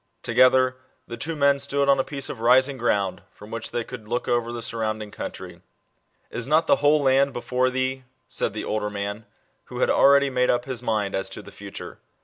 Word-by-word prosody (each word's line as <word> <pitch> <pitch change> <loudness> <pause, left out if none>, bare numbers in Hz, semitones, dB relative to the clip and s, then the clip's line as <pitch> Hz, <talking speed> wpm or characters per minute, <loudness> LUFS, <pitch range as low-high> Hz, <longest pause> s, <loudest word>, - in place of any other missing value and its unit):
Together, 130 0 +4 0.3
the 120 - -7
two 155 +8 -3
men 140 -1 +3
stood 140 0 0
on 140 -1 +4
a - - +3
piece 140 -1 -4
of 125 - -6
rising 130 +4 +4
ground, 100 -6 0
from 105 +1 -14
which 115 -1 -4
they 120 - -2
could 115 -2 -10
look 120 +2 -2
over 120 -1 0
the 120 - -5
nrrounding 110 -2 -3
country. - - -7 0.3
" - - -45 0.3
Is 120 +1 -3
not 155 +3 +3
the - - +4
whole 145 0 +3
land 135 0 +3
before 125 +1 0
thee? 130 0 -2
" - - -46
said 100 - -2
the 110 - -4
older 105 -1 -2
man, 100 +1 -5 0.4
who - - -9
had - - +3
already 140 0 +5
made 125 0 +1
up 120 0 +1
his 130 -3 -4
mind 105 -4 -1
as 95 0 -1
to 95 - -9
the - - -12
future. - - -9
125 Hz, 215 wpm, -24 LUFS, 110-135 Hz, 0.4 s, already